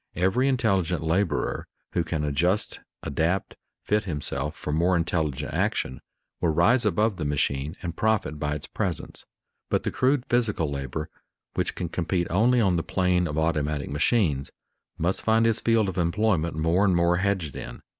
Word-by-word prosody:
Every 95 Hz, -, +2 dB
intelligent 95 Hz, -, +1 dB
laborer 80 Hz, -1 st, 0 dB, 0.3 s
who 85 Hz, -, +1 dB
can 80 Hz, -2 st, -2 dB
adjust, 85 Hz, +8 st, 0 dB, 0.2 s
adapt, 85 Hz, +6 st, -1 dB, 0.3 s
fit 105 Hz, 0 st, +1 dB
himself 75 Hz, -2 st, -3 dB
for 75 Hz, -, -4 dB
more 85 Hz, +4 st, +3 dB
intelligent 80 Hz, -4 st, -1 dB
action 65 Hz, -, -1 dB, 0.4 s
will 85 Hz, -, +1 dB
rise 110 Hz, +10 st, +3 dB
above 105 Hz, -1 st, +1 dB
the 80 Hz, -, -3 dB
machine 70 Hz, +1 st, -1 dB
and 85 Hz, -2 st, -4 dB
profit 105 Hz, -9 st, 0 dB
by 75 Hz, 0 st, -1 dB
its 75 Hz, -, -6 dB
presence. -, -, -4 dB, 0.4 s
But -, -, +1 dB
the -, -, -1 dB
crude 130 Hz, 0 st, +1 dB
physical 105 Hz, -11 st, +1 dB
labor 70 Hz, +3 st, -4 dB, 0.5 s
which -, -, -1 dB
can 90 Hz, -, -3 dB
compete 90 Hz, 0 st, -1 dB
only 120 Hz, +7 st, +4 dB
on 95 Hz, -6 st, +3 dB
the 80 Hz, -, -1 dB
plane 90 Hz, -2 st, +1 dB
of 75 Hz, 0 st, -4 dB
automatic 75 Hz, -3 st, 0 dB
machines, 75 Hz, -, +1 dB, 0.5 s
must 90 Hz, +4 st, 0 dB
find 115 Hz, +1 st, +3 dB
its 115 Hz, -1 st, +1 dB
field 115 Hz, -3 st, +3 dB
of 95 Hz, -1 st, -3 dB
employment 85 Hz, -2 st, +1 dB
more 80 Hz, +5 st, +2 dB
and 95 Hz, -3 st, +3 dB
more 85 Hz, 0 st, +3 dB
hedged 95 Hz, -5 st, -1 dB
in. -, -, -8 dB
85 Hz, 165 wpm, -26 LUFS, 75-100 Hz, 0.5 s, only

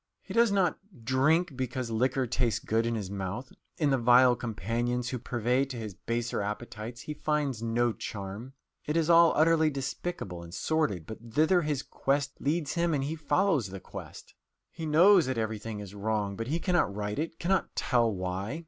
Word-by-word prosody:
He -, -, -8 dB
does 235 Hz, -2 st, +4 dB
not 190 Hz, -4 st, +2 dB, 0.2 s
drink 145 Hz, +6 st, +2 dB
because 125 Hz, -1 st, -3 dB
liquor 130 Hz, +3 st, +1 dB
tastes 120 Hz, -1 st, 0 dB
good 115 Hz, +1 st, 0 dB
in 115 Hz, -, 0 dB
his 100 Hz, -4 st, -4 dB
mouth. 100 Hz, +6 st, -4 dB, 0.3 s
In 150 Hz, -3 st, +2 dB
the 135 Hz, -, +2 dB
vile 125 Hz, +1 st, +6 dB
companions 120 Hz, +2 st, -2 dB
who 125 Hz, -, -3 dB
purvey 125 Hz, +2 st, 0 dB
to 130 Hz, -2 st, -6 dB
his 110 Hz, -3 st, -5 dB
baser 115 Hz, +3 st, -2 dB
appetites 110 Hz, +2 st, -5 dB
he 150 Hz, -, -5 dB
finds 150 Hz, -5 st, -1 dB
no 115 Hz, +1 st, +1 dB
charm. 105 Hz, +6 st, -7 dB, 0.3 s
It 150 Hz, +2 st, 0 dB
is 165 Hz, 0 st, +3 dB
all 170 Hz, 0 st, +7 dB
utterly 160 Hz, 0 st, +4 dB
despicable 135 Hz, -, -4 dB
and 85 Hz, +1 st, -9 dB
sordid, 110 Hz, -, 0 dB
but 110 Hz, -, -8 dB, 0.2 s
thither 165 Hz, +4 st, +4 dB
his 150 Hz, -4 st, -1 dB
quest 140 Hz, 0 st, -1 dB
leads 150 Hz, +1 st, 0 dB
him 170 Hz, -2 st, +1 dB
and 135 Hz, -, -1 dB
he 145 Hz, +3 st, -2 dB
follows 160 Hz, -, +1 dB
the 95 Hz, +1 st, -7 dB
quest. -, -, -10 dB, 0.4 s
He 165 Hz, -2 st, -6 dB
knows 175 Hz, +2 st, +6 dB
that 130 Hz, -2 st, -1 dB
everything 110 Hz, -1 st, -3 dB
is 100 Hz, -1 st, -8 dB
wrong, 105 Hz, -1 st, -1 dB
but 115 Hz, +3 st, -4 dB
he 160 Hz, +5 st, -1 dB
cannot 175 Hz, -, +1 dB
right 105 Hz, +3 st, -3 dB
it, 165 Hz, +1 st, -3 dB
cannot 190 Hz, +2 st, 0 dB
tell 120 Hz, -2 st, +2 dB
why. 95 Hz, -, -3 dB
125 Hz, 185 wpm, -29 LUFS, 110-155 Hz, 0.4 s, all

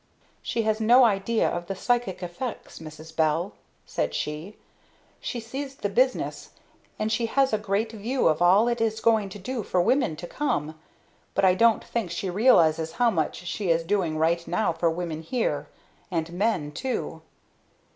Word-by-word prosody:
"She 230 Hz, -, -1 dB
has 220 Hz, 0 st, 0 dB
no 240 Hz, +4 st, +6 dB
idea 220 Hz, 0 st, +2 dB
of 175 Hz, 0 st, -3 dB
the 195 Hz, -, -3 dB
psychic 235 Hz, -3 st, -1 dB
effects, 180 Hz, +8 st, -6 dB
Mrs. 160 Hz, 0 st, -11 dB
Bell," 160 Hz, +4 st, +1 dB, 0.3 s
said -, -, -2 dB
she. 155 Hz, +7 st, -4 dB, 0.6 s
"She 245 Hz, -, -4 dB
sees 265 Hz, +4 st, -6 dB
the 205 Hz, -, -3 dB
business, 255 Hz, +5 st, 0 dB, 0.4 s
and 215 Hz, +1 st, -1 dB
she 230 Hz, +1 st, +1 dB
has 270 Hz, +1 st, +2 dB
a 215 Hz, -, +2 dB
great 210 Hz, +2 st, -1 dB
view 230 Hz, +4 st, 0 dB
of 155 Hz, +1 st, +2 dB
all 190 Hz, +6 st, +5 dB
it 240 Hz, -1 st, 0 dB
is 220 Hz, -1 st, 0 dB
going 220 Hz, -3 st, +2 dB
to 195 Hz, -, -8 dB
do 230 Hz, +5 st, -4 dB
for 185 Hz, -2 st, -1 dB
women 245 Hz, -, +2 dB
to 165 Hz, -, -8 dB
come; 160 Hz, -, -2 dB, 0.6 s
but 195 Hz, -, +3 dB
I 185 Hz, -, +6 dB
don't 230 Hz, +4 st, +3 dB
think 230 Hz, -6 st, -3 dB
she 180 Hz, +2 st, -3 dB
realizes 165 Hz, -7 st, +4 dB
how 240 Hz, -1 st, +3 dB
much 165 Hz, 0 st, -2 dB
she 185 Hz, +2 st, -3 dB
is 165 Hz, 0 st, +3 dB
doing 170 Hz, -3 st, 0 dB
right 170 Hz, +2 st, +1 dB
now 220 Hz, -6 st, +1 dB
for 165 Hz, +1 st, +1 dB
women 165 Hz, -1 st, -4 dB
here 235 Hz, +8 st, -2 dB, 0.4 s
and 170 Hz, -2 st, -2 dB
men, 180 Hz, -6 st, 0 dB
too. 255 Hz, -, -4 dB
200 Hz, 175 wpm, -26 LUFS, 170-230 Hz, 0.6 s, no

